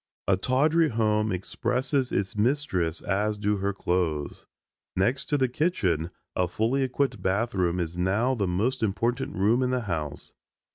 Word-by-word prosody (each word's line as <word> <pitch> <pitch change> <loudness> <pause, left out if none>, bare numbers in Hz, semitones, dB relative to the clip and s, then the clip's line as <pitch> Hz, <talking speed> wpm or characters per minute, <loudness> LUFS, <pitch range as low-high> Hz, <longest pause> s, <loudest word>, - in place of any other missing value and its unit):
A 95 - +5
tawdry 150 - +2
home 110 -2 +1
expresses 125 +8 -1
its 95 0 -1
mistress 105 - 0
as 105 +2 0
do 105 0 0
her 100 +1 0
clothes. 85 -6 -2 0.5
Next 120 +10 +1
to 145 - +1
the 130 -2 +2
kitchen 105 - 0 0.3
a 90 - +1
fully 115 +9 0
equipped 130 -4 0
bath 105 +6 0
room 90 -2 +1
is 85 0 -3
now 100 +8 +2
the 105 -6 0
most 110 +9 0
important 115 +3 -1
room 110 +7 +3
in 125 - +1
the 125 -1 0
house. 80 -8 -4
105 Hz, 155 wpm, -27 LUFS, 95-125 Hz, 0.5 s, A